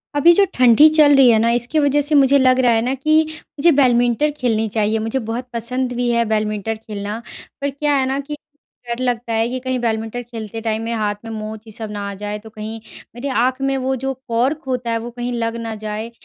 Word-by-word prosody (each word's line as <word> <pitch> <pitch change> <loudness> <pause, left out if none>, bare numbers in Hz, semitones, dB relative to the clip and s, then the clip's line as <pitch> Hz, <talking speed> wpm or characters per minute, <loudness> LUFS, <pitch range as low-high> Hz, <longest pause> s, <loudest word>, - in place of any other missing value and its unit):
अभी 335 +4 +6
जो 400 - +5
ठंडी 250 +4 +6
चल 295 -2 +6
रही 270 -2 +7
है 225 - +5
न 225 - +2
इसकी 240 +6 0
वजह 290 0 +2
से 295 +1 +1
मुझे 275 0 +5
लग 260 -1 +4
रहा 245 -2 +4
है 225 -1 +2
न - - 0
कि 310 +4 +3 0.4
मुझे 340 +4 +5
बैडमिंटन 245 +2 +3
खेलनी 225 -4 0
चाहिए 215 0 +1
मुझे 225 +4 -2
बहुत 245 +3 -4
पसंद 245 +2 -2
भी 245 0 -1
है 235 0 +2
बैडमिंटन 215 0 -1
खेलना 210 0 -6 0.4
पर 280 - 0
क्या 285 +1 0
है 265 - +2
न 270 - -1
कि 300 - -4 0.5
डर 235 0 -3
लगता 240 -2 -2
है 225 +1 +1
कि 255 +1 -3
कहीं 255 0 -2
बैडमिंटन 225 +1 -2
खेलते 225 -2 -7
टाइम 220 -1 -2
में 230 +1 -3
हाथ 210 -2 -1
में 225 - -6
मोच 215 0 -6
ये - - -10
सब 220 0 -7
ना 205 -1 -5
आ - - -6
जाए 210 0 -4
तो 220 +1 -13
कहीं 220 +1 -7 0.4
मेरी 245 +4 -5 0.2
आँख 255 +1 0
में 270 0 0
वो 265 - +1
जो 270 - -1
कॉर्क 255 +6 0
होता 250 -2 -2
है 230 - +1
वो 235 +1 -6
कहीं 245 +1 -4
लग 230 -1 -2
ना 225 -1 -4
जाए। 215 +2 -5
235 Hz, 235 wpm, -19 LUFS, 220-260 Hz, 0.5 s, रही